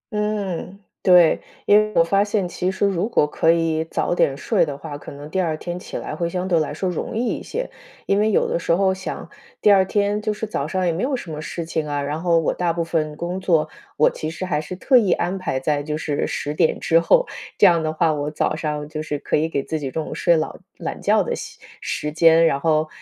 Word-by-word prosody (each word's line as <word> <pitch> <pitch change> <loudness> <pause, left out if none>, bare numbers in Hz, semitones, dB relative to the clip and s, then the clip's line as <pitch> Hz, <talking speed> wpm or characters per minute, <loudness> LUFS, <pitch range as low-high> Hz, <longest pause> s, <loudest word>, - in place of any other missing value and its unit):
嗯， 200 -3 -2 0.2
对。 180 -3 +5 0.2
因 205 - +5
为 215 0 0
我 165 - +6
发 195 +4 +2
现 205 -3 -1
其 180 +1 -2
实 190 +2 0
如 195 +2 0
果 230 - +3
可 160 +2 +2
以 165 -1 +1
早 165 - -1
点 140 -5 +1
睡 - - +1
的 145 -4 -3
话， 145 0 -7
可 145 - -9
能 145 +1 -9
第 185 +4 -1
二 160 -3 -1
天 175 +2 -5
起 - - -7
来 - - -5
会 170 -1 -2
相 180 +1 -3
对 175 -3 +3
来 155 - -1
说 170 +5 -3
容 180 +5 -3
易 245 - 0
一 - - -7
些。 - - -4 0.4
因 195 - +2
为 215 +1 +3
有 - - +2
的 - - -1
时 - - -2
候 190 +2 +3
想 190 0 -6 0.3
第 210 - +5
二 195 -1 +6
天 205 +2 0
就 215 0 -1
是 210 +1 -4
早 155 -9 -3
上 185 +2 -1
也 175 - +2
没 170 - -3
有 270 +1 0
什 185 -10 -7
么 150 - -5
事 165 +2 -5
情 160 -2 -2
啊， 145 -1 -2
然 150 +3 -3
后 170 -1 +3
我 165 - +1
大 175 -1 0
部 170 - -1
分 155 -2 -2
工 175 +4 -4
作 160 -4 +2 0.3
我 155 - +5
其 155 - -5
实 165 +3 -5
还 150 -4 -1
是 170 +4 -7
特 255 +8 +4
意 200 -6 +2
安 180 +2 -1
排 165 -8 -2
在 145 +2 0
就 150 +1 -3
是 150 -2 -2
10 145 - -3
点 160 +1 +1
之 165 +1 +3
后， - - +4 0.3
这 - - +6
样 170 -3 +5
的 155 - -1
话， 160 0 +1
我 145 0 -2
早 155 0 -1
上 150 -2 -3
就 155 0 -5
是 150 -2 -3
可 - - -2
以 160 +2 +1
给 140 -3 -1
自 160 +2 -3
己 140 - -4
中 160 +3 -3
午 - - -6
睡 170 -1 +3
老 155 - -2 0.2
懒 - - -5
觉 - - +3
的 - - -2
习 - - -9 0.2
时 150 - -3
间， 165 +1 +5
然 140 -4 +2
后 155 0 +2
165 Hz, 275 characters per minute, -22 LUFS, 155-190 Hz, 0.4 s, 我